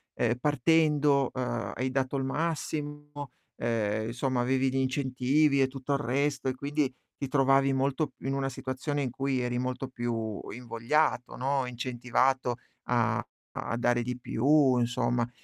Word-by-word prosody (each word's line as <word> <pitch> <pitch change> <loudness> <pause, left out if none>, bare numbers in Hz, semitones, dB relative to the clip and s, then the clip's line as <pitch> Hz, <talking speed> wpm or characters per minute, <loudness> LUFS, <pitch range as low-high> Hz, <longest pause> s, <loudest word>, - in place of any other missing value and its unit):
ehm, 120 0 +1
partendo, 145 -1 +3
ehm, 130 -1 -2
hai 130 +2 -1
dato 130 0 0
il 135 - -1
massimo, 145 -2 -3 0.3
ehm, 110 -2 0
insomma 125 +1 0
avevi 130 +1 +2
gli 135 - -1
incentivi 135 +2 +2
e 135 - +4
tutto 135 +1 -3
il 140 - +1
resto 135 +3 0
e 130 - -2
quindi 140 0 -1 0.2
ti 140 - -4
trovavi 135 0 +4
molto 135 +1 0
in 135 - -2
una 135 0 0
situazione 135 +3 -3
in 125 - -2
cui 135 +1 -1
eri 120 0 -1
molto 130 +1 -2
più 115 -4 -3
invogliato, 125 +4 0
no, 135 0 0
incentivato 125 +1 0 0.3
a 120 -3 +1 0.3
a 115 - -3
dare 120 0 +2
di 125 +1 -3
più 135 +2 +3
insomma, 120 0 +1
130 Hz, 150 wpm, -29 LUFS, 120-140 Hz, 0.3 s, e